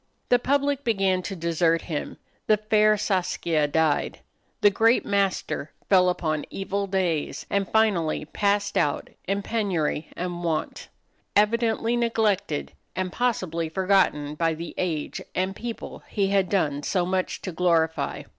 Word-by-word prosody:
The 245 - +5
public 280 +1 +1
began 195 -6 +1
to 195 - -5
desert 165 -1 +1
him, 155 -4 -4 0.3
the 215 - +5
fair 215 0 +3
Saskia 175 -6 0
died, 155 0 0 0.4
the 205 - +6
great 225 +4 +3
master 195 -6 -1 0.2
fell 185 -2 +5
upon 155 -4 -1
evil 195 +1 -3
days, 180 -5 -1
and 200 -1 0
finally 195 -9 +2
passed 200 +4 0
out 145 - -1 0.2
in 200 +1 -1
penury 180 -9 -1
and 175 -1 -4
want 160 -2 -2 0.5
evidently 225 +2 +2
neglected 215 - 0 0.2
and 185 -1 -2
possibly 185 -10 -1
forgotten 185 -5 +2
by 165 +1 0
the 170 +1 -7
age 160 -5 -2
and 185 +1 -1
people 235 +1 -6
he 200 -2 0
had 195 -2 +2
done 145 -8 +1
so 180 +4 0
much 185 0 -2
to 185 - -3
glorify. 165 -2 +1
185 Hz, 135 wpm, -25 LUFS, 165-210 Hz, 0.5 s, the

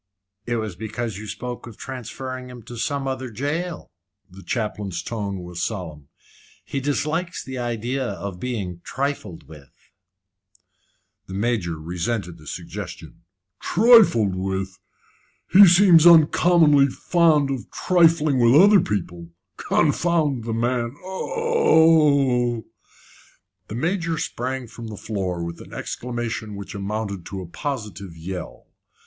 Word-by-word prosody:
"It 120 - 0
was 110 -5 -3
because 110 +1 -5
you 110 - -8
spoke 120 +4 -6
of 115 - -11
transferring 130 0 -7
him 125 -2 -11
to 120 - -10
some 140 +3 -2
other 130 -1 -3
jail." 150 +9 -4 0.4
The 95 +2 -12
chaplain's 105 -6 -3
tone 100 -4 -4
was 90 -1 -7
solemn. 85 -8 -5 0.6
"He 140 - -3
dislikes 155 +5 -2
the 130 -1 -6
idea 120 +2 -2
of 100 -6 -6
being 95 -7 -4
trifled 135 - -4
with." 75 -4 -14 1.6
The 95 - -7
Major 100 -6 -1
resented 90 +2 -3
the 75 - -15
suggestion. - - -8 0.4
"Trifled 195 - +5
with? 95 0 -3 0.7
He 195 +1 +9
seems 175 -2 +7
uncommonly 160 -3 +6
fond 155 -1 +2
of 130 -3 -5
trifling 165 -6 +3
with 120 +4 +6
other 200 +2 +7
people. 90 - -3 0.3
Confound 155 -9 +1
the 115 - -3
man! 120 +1 -1
Oh 160 - +3
h!" 110 - -8 1.0
The 105 - -6
Major 165 +4 -1
sprang 130 -1 -3
from 115 0 -10
the 105 -2 -8
floor 95 -5 -3
with 85 0 -6
an - - -13
exclamation 120 -3 -4
which 100 0 -8
amounted 100 -1 -4
to 95 -1 -6
a - - -7
positive 100 - -6
yell. 90 +1 -7
120 Hz, 125 wpm, -23 LUFS, 100-145 Hz, 1.6 s, He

